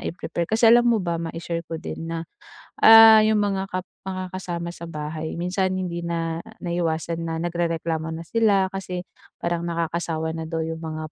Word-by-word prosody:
i-prepare. 170 Hz, -1 st, -3 dB
Kasi 225 Hz, +1 st, +4 dB
alam 240 Hz, +1 st, +6 dB
mo 235 Hz, -, +4 dB
ba, 170 Hz, -2 st, -1 dB
mai-share 165 Hz, 0 st, -4 dB
ko 165 Hz, 0 st, -5 dB
din 165 Hz, -, -6 dB
na, 165 Hz, 0 st, -4 dB, 0.6 s
ah, 225 Hz, 0 st, +10 dB
'yung 215 Hz, -1 st, +3 dB
mga 195 Hz, -2 st, -1 dB
kap 185 Hz, 0 st, -2 dB, 0.3 s
makakasama 180 Hz, -2 st, -5 dB
sa 170 Hz, -1 st, -9 dB
bahay 155 Hz, +1 st, -5 dB
minsan 180 Hz, +2 st, 0 dB
hindi 175 Hz, -2 st, -3 dB
na 165 Hz, -1 st, -2 dB, 0.2 s
naiiwasan 170 Hz, -1 st, -1 dB
na 165 Hz, -1 st, -3 dB
nagrereklamo 165 Hz, -1 st, -2 dB
na 160 Hz, +1 st, -5 dB
sila, 205 Hz, -1 st, +3 dB
kasi 185 Hz, -2 st, -4 dB, 0.3 s
parang 170 Hz, 0 st, -2 dB
nakakasawa 165 Hz, -1 st, -2 dB
na 160 Hz, 0 st, -5 dB
daw 165 Hz, -1 st, -2 dB
'yung 160 Hz, 0 st, -5 dB
mga 155 Hz, -1 st, -6 dB
170 Hz, 165 wpm, -24 LUFS, 165-185 Hz, 0.6 s, ah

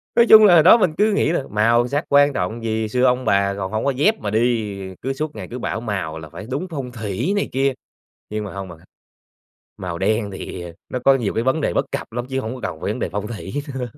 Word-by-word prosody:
nói 235 Hz, -, +6 dB
chung 215 Hz, -1 st, +10 dB
là 185 Hz, -, +7 dB
hồi 160 Hz, -, +7 dB
đó 185 Hz, +7 st, +8 dB
mình 185 Hz, -8 st, +1 dB
cứ 210 Hz, +1 st, +3 dB
nghĩ 180 Hz, -, +2 dB
là 155 Hz, -, 0 dB
màu 115 Hz, +3 st, +3 dB
sắc 145 Hz, +5 st, -1 dB
quan 145 Hz, 0 st, +5 dB
trọng 110 Hz, +3 st, -3 dB
gì, 110 Hz, -1 st, -1 dB
xưa 125 Hz, +4 st, 0 dB
ông 125 Hz, 0 st, +2 dB
bà 100 Hz, -1 st, +2 dB
còn 95 Hz, -1 st, -4 dB
hổng 110 Hz, +4 st, -2 dB
có 140 Hz, -, +3 dB
dép 180 Hz, +12 st, +2 dB
mà 100 Hz, -, -3 dB
đi, 110 Hz, -3 st, 0 dB
ờ, 95 Hz, -, -11 dB
cứ 135 Hz, +2 st, -2 dB
suốt 150 Hz, +1 st, -4 dB
ngày 95 Hz, -4 st, -7 dB
cứ 125 Hz, -, -5 dB
bảo 110 Hz, -, -3 dB
màu 95 Hz, -8 st, -3 dB
là 80 Hz, -1 st, -10 dB
phải 105 Hz, -, -9 dB
đúng 155 Hz, +8 st, -2 dB
phong 135 Hz, -6 st, -5 dB
thủy 115 Hz, -, -2 dB
này 200 Hz, -, -1 dB
kia. 135 Hz, 0 st, +1 dB, 0.6 s
Nhưng 105 Hz, 0 st, -3 dB
mà 100 Hz, -, -7 dB
hông 95 Hz, -1 st, -6 dB
bạn 85 Hz, -, -11 dB
à, 90 Hz, -, -21 dB, 0.9 s
màu 85 Hz, -2 st, -5 dB
đen 105 Hz, +2 st, 0 dB
thì, 95 Hz, -1 st, -7 dB
ờ, 85 Hz, -1 st, -8 dB, 0.2 s
nó 125 Hz, -, -3 dB
có 135 Hz, -, +6 dB
nhiều 120 Hz, -6 st, -1 dB
cái 115 Hz, -, 0 dB
vấn 130 Hz, +4 st, +1 dB
đề 85 Hz, -, 0 dB
bất -, -, +1 dB
cập -, -, -4 dB
lắm 120 Hz, +1 st, -4 dB
chứ 130 Hz, -, -1 dB
hổng 120 Hz, 0 st, -4 dB
có 125 Hz, -, -10 dB
cần 90 Hz, -5 st, -4 dB
phải -, -, -1 dB
vấn -, -, -5 dB
đề -, -, -2 dB
phong 105 Hz, +2 st, -4 dB
thủy 115 Hz, +1 st, -7 dB, 0.2 s
nữa. 130 Hz, -1 st, -3 dB
120 Hz, 280 wpm, -21 LUFS, 100-135 Hz, 0.9 s, chung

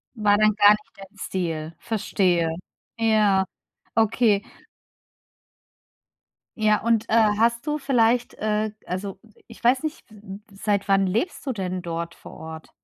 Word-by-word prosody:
War 210 Hz, -2 st, +3 dB
dann 215 Hz, 0 st, +4 dB
gar 205 Hz, -1 st, +7 dB
nicht 210 Hz, 0 st, -1 dB
dein 195 Hz, +1 st, -14 dB
Stil. 165 Hz, -4 st, -3 dB
Verstehe, 185 Hz, -6 st, 0 dB, 0.5 s
ja, 215 Hz, -4 st, +3 dB, 0.5 s
okay. 220 Hz, -2 st, +3 dB, 2.2 s
Ja, 215 Hz, -1 st, +2 dB
und, 230 Hz, 0 st, +1 dB
äh, -, -, -1 dB, 0.2 s
hast 235 Hz, +4 st, +1 dB
du 300 Hz, 0 st, 0 dB
vielleicht 245 Hz, -4 st, +2 dB
äh, 215 Hz, 0 st, -1 dB
also, 190 Hz, +2 st, -5 dB, 0.2 s
i -, -, -25 dB
ich 230 Hz, -, -14 dB
weiß 255 Hz, +5 st, +3 dB
nicht, 310 Hz, -6 st, -5 dB
s 215 Hz, -, -16 dB, 0.4 s
s 195 Hz, -, -14 dB
seit 205 Hz, -2 st, +1 dB
wann 195 Hz, 0 st, +3 dB
lebst 225 Hz, -, -2 dB
du 270 Hz, -, -1 dB
denn 185 Hz, -5 st, -3 dB
dort 170 Hz, -1 st, -5 dB
vor -, -, -13 dB
Ort? 160 Hz, 0 st, -9 dB
210 Hz, 145 wpm, -24 LUFS, 190-230 Hz, 2.2 s, gar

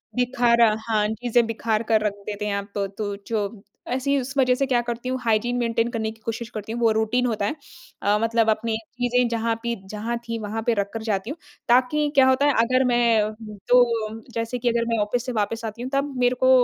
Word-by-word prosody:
बिखारा 235 Hz, -3 st, +3 dB, 0.2 s
हाँ, 210 Hz, -1 st, +2 dB
चीज़ें 235 Hz, +2 st, +1 dB
बिखार 225 Hz, -1 st, -1 dB
कर 220 Hz, -1 st, +4 dB
रख 205 Hz, -, +1 dB
देते 210 Hz, 0 st, -4 dB
हैं 200 Hz, -1 st, -1 dB
आप 200 Hz, +1 st, -6 dB
तो 200 Hz, -1 st, 0 dB
तू 200 Hz, 0 st, -4 dB
जो 210 Hz, -2 st, -2 dB, 0.3 s
ऐसी 270 Hz, +3 st, +1 dB
उस 265 Hz, +2 st, -6 dB
वजह 255 Hz, -1 st, +4 dB
से 275 Hz, -, 0 dB
क्या 245 Hz, -2 st, +2 dB
करती 240 Hz, +2 st, -3 dB
हूँ 260 Hz, 0 st, -1 dB
हाइजीन 235 Hz, +2 st, +1 dB
मेंटेन 230 Hz, -1 st, +1 dB
करने 220 Hz, -2 st, -2 dB
की 225 Hz, -, -16 dB
कोशिश 230 Hz, 0 st, -4 dB
करती 215 Hz, 0 st, -6 dB
हूँ 235 Hz, -, -3 dB
वो 225 Hz, -1 st, +4 dB
रूटीन 220 Hz, +3 st, +1 dB
होता 215 Hz, -4 st, 0 dB
है। 300 Hz, -, -1 dB, 0.5 s
अ, 205 Hz, +1 st, +2 dB
मतलब 230 Hz, -1 st, +2 dB
अपनी 220 Hz, +1 st, 0 dB, 0.2 s
चीज़ें 245 Hz, 0 st, +2 dB
जहाँ 230 Hz, 0 st, 0 dB
पि 235 Hz, 0 st, -1 dB, 0.2 s
जहाँ 225 Hz, +3 st, -3 dB
थीं 230 Hz, 0 st, -3 dB
वहाँ 215 Hz, +1 st, -4 dB
पे 235 Hz, -, +4 dB
रख 200 Hz, 0 st, -1 dB
कर 225 Hz, -, -4 dB
जाती 205 Hz, 0 st, -2 dB
हूँ, 305 Hz, -, -5 dB, 0.3 s
ताकि 260 Hz, +5 st, +3 dB
क्या 265 Hz, -1 st, +6 dB
होता 260 Hz, +2 st, +3 dB
है, 290 Hz, -, +4 dB
अगर 255 Hz, +2 st, +2 dB
मैं 230 Hz, -3 st, +3 dB, 0.4 s
तो 250 Hz, 0 st, +7 dB, 0.5 s
जैसे 230 Hz, +2 st, -2 dB
कि 240 Hz, 0 st, +1 dB
अगर 235 Hz, 0 st, +1 dB
मैं 230 Hz, -, +1 dB
ऑफ़िस 240 Hz, +4 st, -2 dB
से 250 Hz, -, -3 dB
वापस 225 Hz, +1 st, -2 dB
आती 220 Hz, +2 st, -6 dB
हूँ 255 Hz, -, -4 dB
तब 275 Hz, 0 st, 0 dB
मेरे 245 Hz, 0 st, +3 dB
को 260 Hz, -, +6 dB
230 Hz, 225 wpm, -24 LUFS, 220-245 Hz, 0.5 s, तो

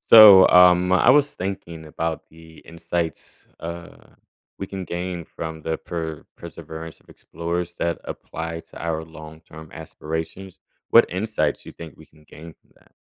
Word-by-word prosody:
So, 105 Hz, -4 st, +9 dB
um, 90 Hz, 0 st, +6 dB
I 95 Hz, +6 st, +5 dB
was 145 Hz, +1 st, +4 dB
thinking 85 Hz, -4 st, -6 dB
about 80 Hz, +1 st, -4 dB
the 80 Hz, 0 st, -17 dB
insights, 85 Hz, 0 st, -5 dB
uh, 85 Hz, 0 st, -8 dB, 0.6 s
we 95 Hz, -, -5 dB
can 95 Hz, -1 st, -6 dB
gain 90 Hz, 0 st, -5 dB
from 80 Hz, -1 st, -8 dB
the 80 Hz, +1 st, -3 dB
per 80 Hz, -3 st, -6 dB
perseverance 80 Hz, 0 st, -10 dB
of -, -, -31 dB
explorers 85 Hz, +1 st, -5 dB
that 85 Hz, 0 st, -2 dB
apply 80 Hz, 0 st, -6 dB
to -, -, -12 dB
our 80 Hz, -1 st, -2 dB
long-term 80 Hz, 0 st, -13 dB
aspirations. 80 Hz, +4 st, -7 dB, 0.3 s
What -, -, +7 dB
insights 110 Hz, +5 st, -2 dB
you -, -, -9 dB
think 80 Hz, -3 st, -11 dB
we -, -, -16 dB
can 75 Hz, 0 st, -24 dB
gain 80 Hz, +2 st, -13 dB
from -, -, -37 dB
that? -, -, -28 dB
85 Hz, 150 wpm, -22 LUFS, 80-90 Hz, 0.6 s, So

